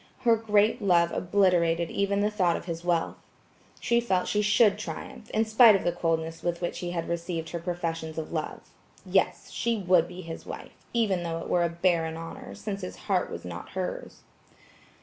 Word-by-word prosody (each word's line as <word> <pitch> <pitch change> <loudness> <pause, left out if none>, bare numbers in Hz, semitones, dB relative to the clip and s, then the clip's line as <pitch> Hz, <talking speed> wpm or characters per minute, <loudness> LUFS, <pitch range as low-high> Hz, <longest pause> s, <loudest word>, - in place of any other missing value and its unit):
Her 235 -3 +5
great 215 +1 +2
love 170 -4 +3
obliterated 175 -3 +2
even 200 0 0
the 210 +1 +1
thought 180 -5 +2
of - - -9
his 170 -1 -5
wealth. 175 -2 0 0.6
She 235 0 +2
felt 190 -6 0
she 210 - +1
should 210 0 +4
triumph, 235 +2 -7
in 220 +1 +1
spite 220 0 +7
of 195 - -1
the 175 - +2
coldness 165 -1 -2
with 175 -1 -2
which 175 - -3
he 175 - -4
had 170 -1 -3
received 170 -1 -3
her 170 - -3
professions 165 -2 -4
of 160 - -4
love. 155 -2 -3 0.4
Yes, - - 0
she 235 -1 0
would 180 -4 +3
be 180 +1 -8
his 165 -2 -7
wife, - - -8 0.2
even 210 -6 +1
thought 165 -1 -3
it - - -8
were 175 - +3
a 170 - +1
barren 170 -1 0
honor, 205 +11 -8
since 200 -2 -5
his 180 - -6
heart - - +1
was - - -7
not - - -7
hers. - - -5
180 Hz, 190 wpm, -27 LUFS, 170-210 Hz, 0.6 s, spite